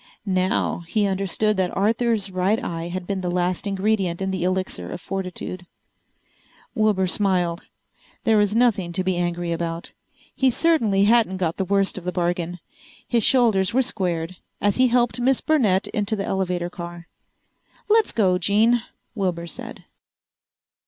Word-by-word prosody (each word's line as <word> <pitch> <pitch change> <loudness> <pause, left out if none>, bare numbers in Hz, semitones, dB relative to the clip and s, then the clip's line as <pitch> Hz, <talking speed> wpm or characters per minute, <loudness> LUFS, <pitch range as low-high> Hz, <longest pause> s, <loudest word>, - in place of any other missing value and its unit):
Now 185 -1 0
he 210 +4 +1
understood 195 +2 0
that 185 -2 -1
Arthur's 220 0 +1
right 185 +4 +1
eye 165 0 -4
had 180 +1 -5
been 195 0 -3
the 180 - -2
last 180 +2 -1
ingredient 195 -3 0
in 190 0 -2
the 185 -2 -2
Elixir 185 +1 -2
of 180 - -5
Fortitude! 185 -1 -5 1.1
Wilbur 210 -3 +2
smiled. 180 -3 0 0.6
There 225 -3 +4
was 205 0 +2
nothing 210 -8 +2
to 185 +1 0
be 185 0 0
angry 175 0 -2
about. 165 0 -3 0.4
He 265 - +2
certainly 235 -9 +2
hadn't 215 -3 +3
got 170 -3 -1
the 190 - -1
worst 195 0 +1
of - - -15
the 180 - -2
bargain! 175 0 -2 0.5
His 235 -3 +1
shoulders 225 -6 +3
were 265 - +4
squared 175 -5 -2 0.2
as 205 0 +1
he 255 0 +5
helped 245 0 +1
Miss 260 +1 +2
Burnett 220 - +2
into 210 +1 -1
the 200 -2 -3
elevator 180 -2 -1
car. 170 -1 -8 0.8
"Let's 440 0 +3
go, 185 -5 +2
Jean," 220 +6 +3 0.3
Wilbur 180 -6 -2
said. 170 - -8
190 Hz, 150 wpm, -23 LUFS, 180-215 Hz, 1.1 s, he